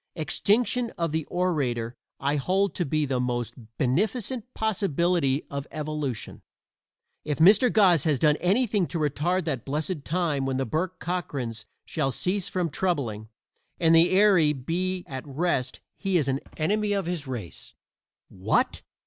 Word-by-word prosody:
Extinction 225 - +1
of 170 -2 -1
the 160 -1 -1
orator 130 -10 -1 0.2
I 140 +2 0
hold 190 +7 +1
to 175 - -1
be 155 +1 0
the 130 -2 -1
most 120 -2 -2 0.2
beneficent 220 - -1
possibility 175 -8 +1
of 140 0 -4
evolution. 150 -5 -4 0.8
If 150 -1 -2
Mr. 205 +9 +6
Goss 185 -8 +5
has 150 -3 +2
done 150 +3 +4
anything 205 0 +1
to 175 - -4
retard 160 +4 0
that 135 -8 -2
blessed 150 +2 -3
time 155 -5 0
when 130 -1 -1
the 135 - 0
Bourke 160 +9 -2
Cockrans 140 -10 -4 0.2
shall 150 -4 -1
cease 185 +8 -1
from 175 -4 -1
troubling 120 - -2 0.5
and 165 -2 +4
the 165 +1 +7
weary 185 -6 +5
be 180 +7 -2
at 130 -1 -6
rest 140 -2 -1 0.2
he 195 -3 +1
is 150 -5 +1
an 135 0 0 0.2
enemy 205 +6 +1
of 195 -3 -1
his 170 -5 -3
race. 115 -10 -7 0.5
"What!" 95 - 0
160 Hz, 150 wpm, -26 LUFS, 135-185 Hz, 0.8 s, the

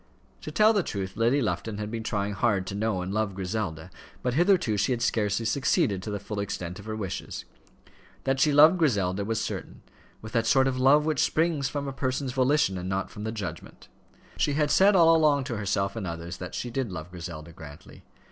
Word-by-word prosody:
To - - -6
tell 215 +1 +5
the 205 - +2
truth, 95 - -5
Lady 120 +5 +2
Lufton 105 +2 -2
had 105 0 -5
been 115 -1 -3
trying 100 -2 -2
hard 100 -1 +1
to 95 - -5
know 100 -3 -1
and 95 +2 -4
love 105 -2 -1
Griselda, 90 -3 -4 0.3
but 125 - 0
hitherto 175 - +3
she 105 +6 +1
had 120 - -3
scarcely 105 -1 0
succeeded 110 -5 +1
to 105 - -6
the 105 -1 -3
full 100 +1 -5
extent 90 -2 -4
of 100 - -11
her 110 0 -4
wishes. 100 -4 -5 0.8
That 135 0 0
she 150 +3 +4
loved 155 +5 +7
Griselda 100 - +1
was 110 +2 -1
certain, - - -5 0.4
with 110 - -10
that 115 -2 0
sort 135 +1 +4
of 130 -1 -1
love 145 +4 +5
which 155 -1 +1
springs 160 -4 +1
from 140 -1 -4
a 135 - -4
person's 130 0 -2
volition 130 -7 +2
and 90 +1 -5
not 95 0 -2
from 105 - -7
the 110 - -2
judgment. 90 -7 -7 0.5
She 145 - +1
had 150 0 +1
said 200 +1 +5
all 165 -2 +6
along 150 -3 +3
to 125 -3 -4
herself 100 0 -1
and 105 -5 -4
others 85 +1 -6
that 90 - -7
she 120 - -4
did 125 -4 -2
love 85 0 -7
Griselda 85 -2 -8
Grantly. 75 -3 -13
110 Hz, 215 wpm, -27 LUFS, 95-135 Hz, 0.8 s, loved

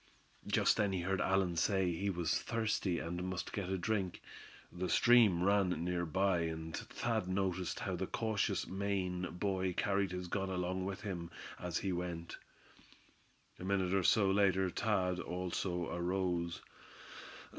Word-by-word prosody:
Just - - +3
then 100 -2 +2
he 90 - -1
heard 95 +2 0
Allan 95 -2 +2
say 95 +1 +2
he 95 +4 -1
was 85 -4 0
thirsty, 110 -6 0
and 85 +2 -3
must 95 -1 -4
get 95 -3 -3
a 95 - 0
drink. 95 -1 -1 0.5
The 90 +1 -3
stream 110 -8 +5
ran 100 -1 +4 0.2
near 90 -1 -1
by, 95 +2 +2
and 80 0 -4
Thad 110 -5 -2
noticed 95 -1 -1
how - - -2
the - - -2
cautious 110 -3 0
Maine 95 -2 -1
boy 95 +1 -1
carried 100 +1 +1
his 90 -1 -4
gun 95 +2 -2
along 90 0 -1
with 95 0 -4
him 90 -5 -4 0.3
as 90 -2 -2
he 95 - -1
went. 85 -1 -4 1.2
A - - -7
minute 95 -1 +1
or 95 - +3
so 100 +1 +4
later 95 -2 +3
Thad 90 -4 0
also 90 -1 -2
arose. 85 -1 -1
95 Hz, 150 wpm, -35 LUFS, 90-100 Hz, 1.2 s, stream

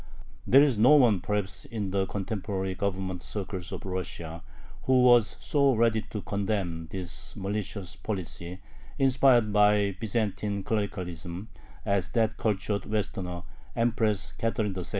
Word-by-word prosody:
There 135 +3 +8
was 135 -7 +3
no 125 +7 +7
one 120 -9 +5
perhaps 100 0 -2
in 105 -4 -4
the 95 0 +1
contemporary 95 -1 -3
Government 95 -1 -2
circles 95 -3 -5
of - - -6
Russia 85 -3 -5 0.4
who 130 -1 +4
was 120 -3 +5
so 140 -3 +2
ready 115 -1 +3
to 105 - -4
condemn 95 -5 -2
this 90 -3 -5
malicious 100 -1 -4
policy, 90 -2 -5 0.4
inspired 130 -5 +4
by 105 -1 +4
Byzantine 105 -2 -1
clericalism, 95 -2 -3 0.4
as 100 -3 +1
that 110 -1 +1
cultured 100 -1 -1
"Westerner," 95 -4 -3 0.3
Empress 110 -4 +1
Catherine 110 -3 -1
II. 90 -2 -4
100 Hz, 130 wpm, -28 LUFS, 95-110 Hz, 0.4 s, There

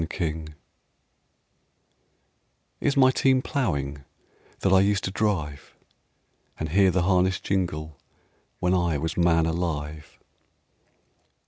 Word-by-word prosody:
XXVII 80 -1 -3 2.3
"Is 145 0 0
my 130 -1 +6
team 130 0 +2
ploughing, 70 - -2 0.6
That 95 - +2
I 95 - +6
was 95 - +4
used 100 -1 +1
to 95 - -2
drive 90 -10 -2 0.8
And 80 - -3
hear 95 +3 +4
the 90 -1 +1
harness 90 0 +2
jingle 80 -6 -3 0.6
When 90 +1 +1
I 85 -4 +1
was 80 +3 -3
man 85 -2 +3
alive?" 80 -3 -4
85 Hz, 110 wpm, -25 LUFS, 80-95 Hz, 2.3 s, my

